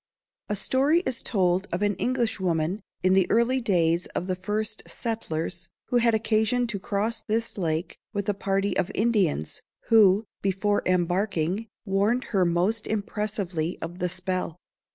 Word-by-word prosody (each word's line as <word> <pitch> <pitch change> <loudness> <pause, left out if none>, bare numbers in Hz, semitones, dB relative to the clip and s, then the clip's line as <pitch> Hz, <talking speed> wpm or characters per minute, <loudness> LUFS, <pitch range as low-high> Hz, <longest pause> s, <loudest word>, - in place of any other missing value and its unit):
A 210 - 0
story 275 - +2
is 260 -9 -2
told 185 -2 +1
of 180 +4 -1
an 205 0 +2
Englishwoman, 195 -7 0 0.2
in 185 0 +4
the 190 -1 +3
early 240 +3 +3
days 170 -5 +2
of - - -1
the 185 0 -1
first 210 +3 -3
settlers, 175 -6 -4 0.2
who 245 - +3
had 230 -1 +4
occasion 220 +2 +2
to 200 - -3
cross 220 +3 -1
this 225 +2 -1
lake 165 -2 -2
with 200 -1 -3
a 205 - +2
party 195 0 0
of 180 - 0
Indians, 200 - +1 0.3
who, 210 -2 +6 0.2
before 200 +2 +1
embarking, 185 +2 0 0.2
warned 205 +5 +1
her 190 -3 +4
most 180 +6 +1
impressively 200 -6 -2
of 175 +2 -6
the 180 - 0
spell. 180 -2 -2
200 Hz, 150 wpm, -26 LUFS, 180-220 Hz, 0.3 s, who